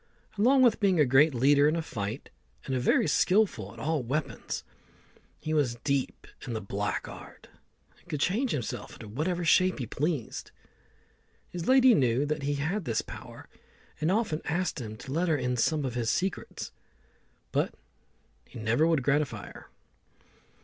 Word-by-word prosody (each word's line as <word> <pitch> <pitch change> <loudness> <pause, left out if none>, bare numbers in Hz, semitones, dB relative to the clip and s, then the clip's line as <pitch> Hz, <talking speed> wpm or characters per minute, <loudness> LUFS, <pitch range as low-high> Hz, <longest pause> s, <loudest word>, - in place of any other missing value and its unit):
Along 260 +6 +4
with 240 -4 +4
being 190 -5 +3
a 150 - +6
great 135 +3 +4
leader 140 +4 +5
in 155 - 0
a 165 - 0
fight, 110 -1 -5 0.3
and 135 - -2
very 130 - +3
skilful 180 - +2
at 115 - -15
all 150 +5 -1
weapons, 135 +5 -3 0.7
he 155 - -4
was 135 -6 +1
deep 140 -2 -1 0.2
in 120 - -3
the 110 - -2
black 100 0 -3
art, - - -12 0.5
and - - -25
could 150 - -2
change 220 - +1
himself 125 - -4
into 110 - -10
whatever 170 - -2
shape 185 +2 +4
he 130 - -3
pleased. 145 +1 -3 1.0
His 175 -2 -5
lady 260 -1 +7
knew 130 - +2
that 150 0 -2
he 145 +1 -1
had 165 +8 -2
this 115 -2 0
power, - - -10 0.5
and 155 +4 +1
often 200 -7 0
asked 170 -3 -1
him 110 -2 -7
to 130 - -9
let 170 +4 +1
her 155 - +3
into 125 -2 0
some 155 -3 +1
of 130 - -3
his 120 -2 -1
secrets, 185 +8 -2 0.8
but - - 0 0.7
he - - -12
never 115 +8 +2
would 160 -5 +2
gratify 145 0 0
her. - - -13
150 Hz, 165 wpm, -29 LUFS, 125-175 Hz, 1.0 s, lady